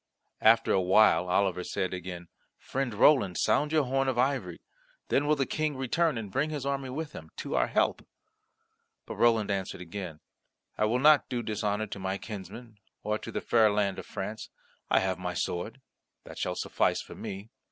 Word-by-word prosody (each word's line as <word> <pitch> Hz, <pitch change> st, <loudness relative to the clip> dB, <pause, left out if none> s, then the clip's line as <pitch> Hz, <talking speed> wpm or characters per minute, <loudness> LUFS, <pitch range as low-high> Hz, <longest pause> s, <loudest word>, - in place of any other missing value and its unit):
After 115 Hz, +1 st, +5 dB
a 95 Hz, -, +3 dB
while, 95 Hz, 0 st, +4 dB
Oliver 90 Hz, -1 st, +1 dB
said 95 Hz, +1 st, -2 dB
again, 90 Hz, -1 st, -6 dB, 0.3 s
"Friend 135 Hz, -2 st, -3 dB
Roland 105 Hz, -, +4 dB
sound 150 Hz, +1 st, +2 dB
your 155 Hz, -2 st, +3 dB
horn 135 Hz, +1 st, 0 dB
of 130 Hz, -2 st, 0 dB
ivory. 135 Hz, +2 st, 0 dB, 0.5 s
Then 145 Hz, -, +2 dB
will 150 Hz, -, +4 dB
the 135 Hz, -2 st, 0 dB
King 155 Hz, -1 st, -2 dB
returns 140 Hz, +3 st, +1 dB
and 105 Hz, -3 st, -6 dB
bring 140 Hz, +8 st, 0 dB
his 145 Hz, -3 st, -4 dB
army 135 Hz, -1 st, -2 dB
with 150 Hz, +4 st, -5 dB
him, 80 Hz, -, -10 dB
to -, -, -5 dB
our -, -, +2 dB
help." -, -, +1 dB, 1.0 s
But -, -, -7 dB
Roland 115 Hz, -3 st, +3 dB
answered 95 Hz, -1 st, -3 dB
again, 90 Hz, -2 st, -7 dB, 0.6 s
"I -, -, +1 dB
will 115 Hz, +3 st, +1 dB
not 150 Hz, +3 st, +5 dB
do 120 Hz, -1 st, -2 dB
dishonour 105 Hz, -1 st, -1 dB
to 100 Hz, -, -7 dB
my 95 Hz, +1 st, -2 dB
kinsmen, 110 Hz, +2 st, -9 dB, 0.2 s
or 105 Hz, 0 st, -1 dB
to -, -, -8 dB
the -, -, -3 dB
fair 110 Hz, -2 st, +4 dB
land 100 Hz, -2 st, 0 dB
of -, -, -9 dB
France. 105 Hz, +2 st, -6 dB, 0.4 s
I -, -, +4 dB
have 95 Hz, -1 st, -1 dB
my 90 Hz, -1 st, -4 dB
sword; 90 Hz, +9 st, -3 dB, 0.4 s
that -, -, -10 dB
shall -, -, -1 dB
suffice -, -, 0 dB
for -, -, -11 dB
me. 100 Hz, +3 st, -7 dB
110 Hz, 185 wpm, -29 LUFS, 95-135 Hz, 1.0 s, After